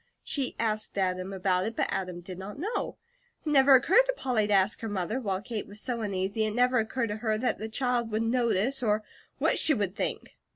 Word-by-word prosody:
She 275 -3 -2
asked 215 -2 -2
Adam 185 0 -1
about 185 -1 +1
it, 225 - -5
but - - +1
Adam 180 -2 -3
did 185 +1 -8
not 195 +5 -7
know. 400 +10 -3 0.5
It - - -1
never 270 -1 +7
occurred 440 - +5
to - - +1
Polly 235 -5 +1
to 210 - +1
ask 195 +2 +2
her 225 - -3
mother, 205 +4 -2
while 195 -5 -2
Kate 230 -2 -4
was 205 +1 -7
so 235 0 -2
uneasy 200 +1 -1
it 215 0 -1
never 250 0 +3
occurred 230 +1 -1
to 210 - -3
her 215 -1 0
that 250 +3 -1
the 220 - -4
child 245 0 0
would 220 +1 0
notice 235 +2 +1
or 215 -2 +1 0.3
what - - +2
she 305 - +4
would 200 -3 -2
think. - - -4
220 Hz, 220 wpm, -28 LUFS, 195-250 Hz, 0.5 s, never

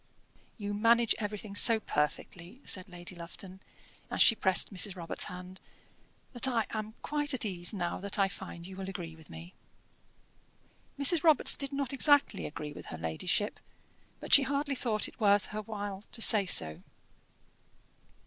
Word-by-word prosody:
"You 205 -2 -5
manage 230 +2 +3
everything 210 -1 -6
so 225 +2 +6
perfectly," 175 - -4
said 185 -1 -3
Lady 175 +1 -9
Lufton, 180 +2 -11 0.5
as - - -5
she - - +7
pressed 190 -1 +4
Mrs. 190 0 +3
Robarts' 170 -2 -2
hand, 180 +1 -10 0.7
"that 245 +1 +3
I 230 -4 0
am 215 0 -6
quite 295 -1 -1
at 240 - -2
ease 175 -4 -3
now 180 -5 -4
that 200 0 -4
I 195 -1 +3
find 190 -3 -9
you 190 +1 -9
will 190 0 -6
agree 170 -4 -7
with 160 -2 -18
me." 80 +2 -11 1.4
Mrs. 295 +3 +4
Robarts 315 -4 +4
did 275 -1 -2
not 275 -1 -3
exactly 285 +1 +3
agree 150 -1 -8
with - - -11
her 80 - -7
ladyship, 85 - -2 0.6
but - - -4
she 280 - +9
hardly 280 +1 -2
thought 230 -5 -1
it - - -16
worth 205 -2 +3
her 215 - -3
while 205 -2 -6
to 230 - -3
say 205 -3 +6
so. 80 - +1
205 Hz, 160 wpm, -30 LUFS, 180-235 Hz, 1.4 s, she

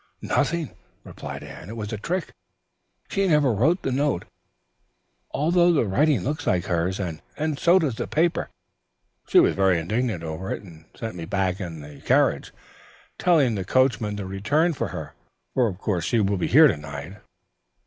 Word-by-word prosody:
"Nothing," 170 -3 0 0.3
replied - - -8
Anne. 90 - -10
"It 115 - -6
was 105 0 -5
a - - -2
trick. 180 - -3 0.8
She 195 -1 +1
never 150 -7 +3
wrote 155 - +2
the 135 - -1
note, 140 -7 0 1.0
although 170 +5 +3
the 150 -8 +2
writing 130 - +2
looks 150 +2 -3
like 90 -2 +1
hers, 90 +2 -1
and 85 -5 -4 0.4
so 175 +2 +5
does 145 -10 0
the 120 - -3
paper. 165 +2 0 0.8
She - - +6
was - - +4
very 95 -2 +3
indignant 105 +1 -2
over 80 +4 -5
it - - -4
and 80 -4 -14
sent 115 -1 -5
me 85 -2 -6
back 95 0 -1
in 85 -4 -6
the 75 -1 -12
carriage, - - +2 0.7
telling 155 -9 +3
the 100 -3 -2
coachman 110 -1 +1
to 100 - -4
return 130 - +1
for - - -2
her, - - -7 0.4
for 125 -3 +3
of 95 -4 -4
course 90 -4 -2
she 115 - +1
will 100 -1 +1
be 90 - -1
here 155 +4 +7
to 80 - 0
night. 75 +5 -8
110 Hz, 175 wpm, -24 LUFS, 90-150 Hz, 1.0 s, here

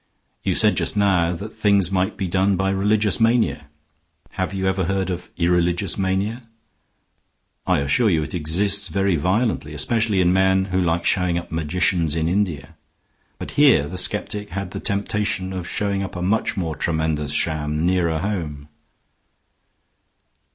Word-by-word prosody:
You - - 0
said - - +4
just - - +1
now 90 -4 +2
that 105 +5 -8
things 100 -3 +2
might 95 +2 -1
be 95 - -2
done 95 +2 +1
by 95 +1 0
religious 105 +2 +1
mania. 115 -9 +1 0.6
Have - - -3
you 95 -1 -3
ever 95 -1 0
heard 95 0 -1
of 90 0 -6
irreligious 90 +1 +1
mania? 100 +5 -2 1.2
I - - +2
assure 105 - +2
you 80 -5 +1
it - - -7
exists 95 +5 +2
very 95 +2 0
violently, 90 -2 -1
especially 110 +4 +1
in 90 0 +3
men 95 0 +2
who 95 - +2
like 85 -1 0
showing 90 -3 +1
up 85 - -6
magicians 80 0 0
in 80 -1 0
India. 80 -5 -2 0.6
But - - -7
here 120 - +5
the 90 - -8
skeptic 105 +2 -1
had 95 0 -5
the - - -5
temptation 100 -2 -1
of 90 -2 -5
showing 100 -1 -1
up 95 - -6
a 90 - -4
much 105 +4 0
more 80 -4 -2
tremendous 80 -1 -1
sham 75 -1 -1
nearer 85 -1 +1
home." 80 -6 -4
95 Hz, 155 wpm, -21 LUFS, 85-100 Hz, 1.2 s, here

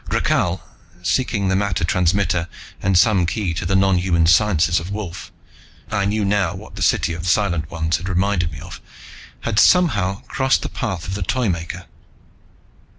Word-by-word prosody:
Rakhal, - - 0 0.4
seeking 105 -1 0
the 95 - +1
matter 100 -3 0
transmitter 90 0 +1 0.3
and 95 -1 +2
some 90 -1 +4
key 90 0 -2
to 85 - -3
the 95 - +1
nonhuman 90 -3 +2
sciences 85 -1 +3
of 85 +3 -7
Wolf 100 -4 -6 0.6
I 100 -2 0
knew 105 +1 0
now 100 0 +1
what - - -11
the - - -7
city 85 - +2
of 85 +2 -5
Silent 85 -6 +1
Ones 80 -1 -1
had 90 +4 -6
reminded 90 -2 0
me 70 - -9
of! - - -10 0.6
had 110 -3 0
somehow 105 - +3
crossed 135 0 0
the - - -3
path 95 -10 -4
of 95 - -4
the 100 - -4
Toymaker. 90 -5 -2
95 Hz, 160 wpm, -20 LUFS, 85-100 Hz, 0.6 s, some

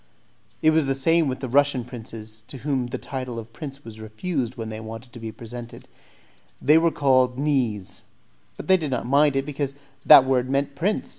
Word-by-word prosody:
It 155 - +6
was 155 -3 +2
the 135 - +1
same 165 +4 +3
with 130 0 -3
the 130 - -3
Russian 135 -1 +2
princes, 110 -3 -8
to 135 - -7
whom 135 -4 0
the 120 - -4
title 130 -3 -6
of 115 0 -8
prince 140 -2 -8
was 110 -1 -10
refused 120 +4 -3
when 115 -3 -5
they 110 0 -6
wanted 115 +2 -9
to 120 - -9
be 110 -1 -6
presented; 120 +1 -10 0.7
they 150 +4 +5
were 165 +1 +3
called 130 -4 +2
"knees," 130 -9 -1 0.6
but - - -8
they 190 0 +6
did 155 -5 -3
not 125 -3 -2
mind 140 +2 +3
it, 135 0 0
because 140 -1 -3 0.3
that 140 -4 +10
word 130 -1 +1
meant 140 +1 0
prince. 185 +9 -1
130 Hz, 200 wpm, -24 LUFS, 115-145 Hz, 0.7 s, that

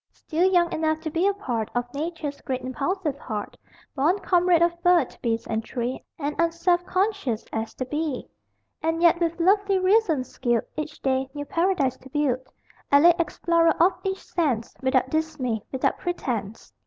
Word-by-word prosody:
Still 350 +4 0
young 345 -2 +3
enough 315 0 0
to 315 -1 -4
be 340 +5 +2
a 400 - +3
part 240 - -3
Of 245 0 -2
Nature's 300 -1 -4
great 260 -2 -3
impulsive 280 +4 -2
heart, 210 -3 -5 0.4
Born 305 +7 +2
comrade 355 -3 +3
of 340 0 0
bird, 350 -7 +3
beast 230 -1 -1
and 225 0 -1
tree 245 +2 -4
And 295 -1 -3
unselfconscious 350 - +1
as 220 0 -3
the 255 - -3
bee 295 -1 -3 0.5
And 325 +1 0
yet 340 0 +5
with 335 0 -1
lovely 395 +2 +3
reason 370 - +3
skilled 240 -2 -1
Each 305 0 -5
day 265 0 +1
new 290 0 -4
paradise 330 -7 +1
to 265 - -15
build; 260 -3 0 0.4
Elate 335 +5 +6
explorer 335 -1 +2
of 355 +3 +5
each 385 -1 -3
sense, 265 -10 -1
Without 260 -1 +1
dismay, 300 -8 -1
without 265 - 0
pretence! 230 - -4
315 Hz, 160 wpm, -25 LUFS, 260-345 Hz, 0.5 s, Elate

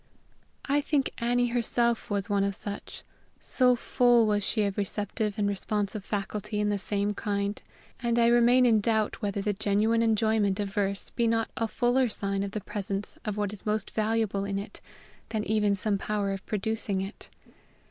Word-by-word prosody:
I 290 +1 +2
think 285 -2 0
Annie 245 +1 +2
herself 235 0 +1
was 200 -1 -1
one 200 -1 +1
of 200 -1 -1
such 205 +1 -7 0.4
so 250 -1 +3
full 240 -1 +3
was 205 -1 +1
she 215 +2 +1
of 200 -1 -1
receptive 205 +1 -2
and 205 -1 +1
responsive 205 +1 -2
faculty 210 +1 -3
in 210 0 +1
the 205 -1 0
same 205 +1 -1
kind, 200 0 -2 0.4
and 235 -2 0
I 235 - +5
remain 240 +2 +5
in 225 -3 +4
doubt 220 0 0
whether 200 -1 -2
the 210 0 0
genuine 210 +3 +1
enjoyment 220 -3 +2
of 200 -1 -3
verse 200 -2 -1
be 235 -1 +1
not 225 0 0
a 225 - -1
fuller 245 +3 +2
sign 195 -2 -1
of 200 - -2
the 215 - -3
presence 200 0 -4
of 210 -1 -3
what 205 -1 -1
is 210 - -8
most 210 -1 -1
valuable 215 -2 0
in 200 0 -2
it 200 - -7 0.5
than 220 -1 -1
even 210 -2 +2
some 200 +1 -1
power 205 -1 -1
of 195 0 -4
producing 215 -1 -2
it. 195 +3 -7
210 Hz, 180 wpm, -28 LUFS, 200-230 Hz, 0.5 s, I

